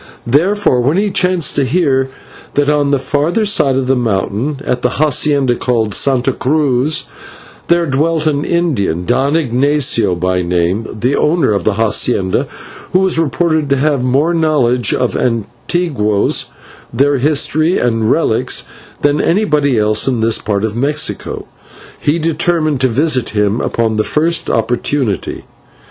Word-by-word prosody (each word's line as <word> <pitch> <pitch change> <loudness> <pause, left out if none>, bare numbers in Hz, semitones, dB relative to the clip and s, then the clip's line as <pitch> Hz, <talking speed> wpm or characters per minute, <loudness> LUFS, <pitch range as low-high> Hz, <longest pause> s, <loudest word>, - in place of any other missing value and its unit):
Therefore, 160 - +2
when 140 +8 +1
he 205 0 0
chanced 180 -4 +1
to 140 - +2
hear 135 -2 +1 0.5
that, 145 0 +2
on 145 -1 +1
the 140 - +2
farther 150 - -1
side 150 -10 +2
of 135 0 0
the 135 +1 +1
mountain, 115 +4 -2
at 125 0 -2
a - - +4
/hacienda/ 140 -2 +1
called 115 -4 0
Santa 135 +1 +1
Cruz, 145 +1 0 0.6
there 170 0 +2
dwelt 155 +3 0
an 145 -2 0
Indian, 120 - -1
Don 135 - +1
Ignatio 130 - +1
by 90 +1 -1
name, 90 +5 -1
the 125 +6 -1
owner 155 -5 +1
of 100 - -1
the 110 - +2
/hacienda/, 105 -2 0 0.5
who 185 - +3
was 190 -3 +1
reported 155 +1 0
to 140 - +3
have 140 -1 0
more 140 +7 +1
knowledge 130 - +1
of - - 0
the - - -3 0.5
/antiguos/, 120 - 0 0.5
their 140 +4 +1
history 155 +4 +1
and 115 -2 0
relics, 130 -4 +1 0.4
than 145 +1 +2
anybody 150 - +1
else 105 +2 +2
in 125 -3 0
this 115 0 +1
part 100 -1 -2
of 110 -1 -2
Mexico, 145 +5 -2 0.5
he 150 +3 0
determined 160 -3 0
to 130 - +4
visit 130 +1 0
him 105 +2 +1
upon 110 -2 -1
the 110 - +2
first 160 +5 0
opportunity. 120 0 -1
135 Hz, 150 wpm, -14 LUFS, 115-155 Hz, 0.6 s, a